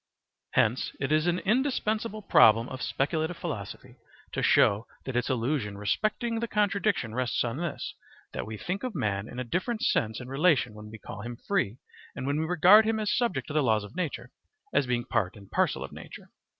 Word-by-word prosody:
Hence 115 +4 +2
it 135 +1 -2
is 155 +2 +3
an 175 0 +2
indispensable 215 -1 0
problem 115 - +6
of 130 -1 -7
speculative 160 +4 -1
philosophy 110 - -6 0.3
to - - -2
show 105 +3 +4 0.2
that 130 - -4
its 125 - 0
illusion 120 -4 -1
respecting 215 - -1
the 235 - -2
contradiction 200 - 0
rests 125 0 0
on 120 +1 -3
this, 170 -3 -4 0.4
that - - -4
we 110 0 -6
think 180 - -3
of 255 -4 -4
man 100 0 -1
in 125 - -9
a 125 - -2
different 215 - -2
sense 110 - +1
and 125 - -8
relation 140 -3 +2
when 105 0 -10
we 110 - -9
call 105 - -9
him 120 +2 -6
free 160 - 0 0.4
and 130 - -5
when 140 +2 0
we 160 - 0
regard 180 +5 +7
him 220 0 0
as 210 -1 0
subject 235 -4 0
to 145 - -7
the 155 - +3
laws 110 -5 +2
of 105 - -11
nature 135 -9 -4 0.4
as 135 - +2
being 120 -1 0
part 95 -3 -1
and 100 -2 -15
parcel - - +1
of - - -8
nature. - - -11
140 Hz, 200 wpm, -28 LUFS, -, 0.4 s, regard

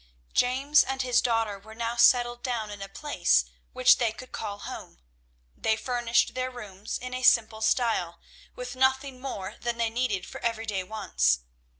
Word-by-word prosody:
James 270 +4 +4
and 265 0 -2
his 250 -2 +3
daughter 225 -4 0
were 220 +2 -13
now 230 +1 -2
settled 240 0 +4
down 230 -5 -3
in 205 -1 -8
a 195 - -6
place 295 +8 +1 0.3
which 255 0 +5
they 235 -3 +2
could 255 +3 -11
call 205 -2 -5
home; - - -9 0.6
they 220 - +1
furnished 240 0 +1
their 255 0 -2
rooms 210 -5 -6
in 250 0 -7
a 255 - -3
simple 225 -3 +4
style, 220 -7 +1 0.4
with 250 0 -6
nothing 265 0 +1
more 205 -8 -6
than 240 -1 -2
they 230 -1 0
needed 225 -6 -1
for - - -9
everyday 225 -4 -2
wants. 65 - +1
235 Hz, 170 wpm, -27 LUFS, 215-255 Hz, 0.6 s, which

